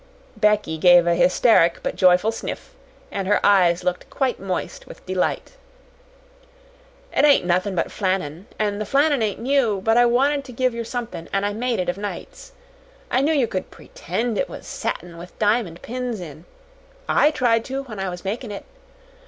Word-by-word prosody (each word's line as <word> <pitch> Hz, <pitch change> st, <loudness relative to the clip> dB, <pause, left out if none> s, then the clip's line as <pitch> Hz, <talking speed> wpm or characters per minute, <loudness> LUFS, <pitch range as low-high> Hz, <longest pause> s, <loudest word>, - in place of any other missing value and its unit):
Becky 210 Hz, -7 st, +1 dB
gave 175 Hz, 0 st, +6 dB
a 170 Hz, -, +3 dB
hysteric 180 Hz, 0 st, +3 dB
but -, -, -2 dB
joyful 185 Hz, +4 st, +4 dB
sniff, 225 Hz, -, -7 dB, 0.4 s
and 195 Hz, -1 st, -3 dB
her 205 Hz, -, +3 dB
eyes 180 Hz, -4 st, +4 dB
looked 180 Hz, 0 st, -2 dB
quite 265 Hz, -3 st, -1 dB
moist 185 Hz, -2 st, -5 dB
with -, -, -13 dB
delight. 185 Hz, -, -2 dB, 1.6 s
"It -, -, +3 dB
ain't 285 Hz, -10 st, +5 dB
nothin' 185 Hz, +2 st, 0 dB
but 165 Hz, -, -1 dB
flannin, 185 Hz, -3 st, -2 dB
an' 205 Hz, -1 st, -1 dB
the 215 Hz, -, -2 dB
flannin 285 Hz, -1 st, +2 dB
ain't 215 Hz, -2 st, -1 dB
new; 240 Hz, -5 st, +1 dB
but 225 Hz, +4 st, +2 dB
I 240 Hz, 0 st, +6 dB
wanted 275 Hz, +4 st, +2 dB
to 250 Hz, -, -10 dB
give 255 Hz, +1 st, 0 dB
yer 235 Hz, 0 st, -4 dB
somethin' 230 Hz, -8 st, -6 dB
an' 195 Hz, 0 st, 0 dB
I 205 Hz, 0 st, -1 dB
made 240 Hz, +2 st, -1 dB
it 180 Hz, -, -2 dB
of 180 Hz, +2 st, -2 dB
nights. -, -, -7 dB, 0.6 s
I 260 Hz, -, +2 dB
knew 295 Hz, +3 st, +2 dB
yer 280 Hz, -6 st, +2 dB
could 185 Hz, -4 st, -4 dB
PRETEND 225 Hz, +5 st, -4 dB
it -, -, -1 dB
was -, -, -9 dB
satin 170 Hz, -1 st, -5 dB
with 175 Hz, +1 st, -12 dB
diamond 210 Hz, -5 st, 0 dB
pins 245 Hz, -2 st, -4 dB
in. 160 Hz, -1 st, -10 dB, 0.6 s
I 295 Hz, -, +4 dB
tried 240 Hz, -6 st, +1 dB
to 270 Hz, +1 st, -4 dB
when 220 Hz, -7 st, -9 dB
I 190 Hz, -1 st, -2 dB
was 180 Hz, +1 st, -8 dB
makin' 220 Hz, +4 st, -4 dB
it. 200 Hz, -, -7 dB
210 Hz, 180 wpm, -22 LUFS, 180-245 Hz, 1.6 s, gave